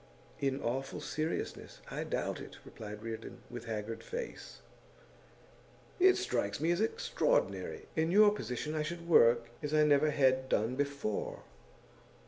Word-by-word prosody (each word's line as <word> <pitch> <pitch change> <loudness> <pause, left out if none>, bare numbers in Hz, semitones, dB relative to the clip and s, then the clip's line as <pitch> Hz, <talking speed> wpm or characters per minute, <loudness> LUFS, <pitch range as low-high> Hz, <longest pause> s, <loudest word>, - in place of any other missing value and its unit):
'In 135 -1 0
awful 135 +3 -2
seriousness, 155 +2 -3
I - - -3
doubt - - -2
it,' - - -10
replied 105 0 -8
Reardon, 115 -1 -7
with - - -7
haggard 110 0 -4
face. 475 0 -6 1.4
'It 375 +1 +6
strikes 100 -5 -1
me 160 +3 +2
as 175 +4 +1
extraordinary. 485 - 0
In 160 +1 +2
your 205 +3 +7
position 150 - -4
I 155 - 0
should 170 +2 -5
work 115 -7 +5
as 150 +1 -1
I 155 - +6
never 150 0 +4
had 130 -2 +2
done 115 +4 +1
before. 140 -6 -2
145 Hz, 135 wpm, -33 LUFS, 120-170 Hz, 1.4 s, your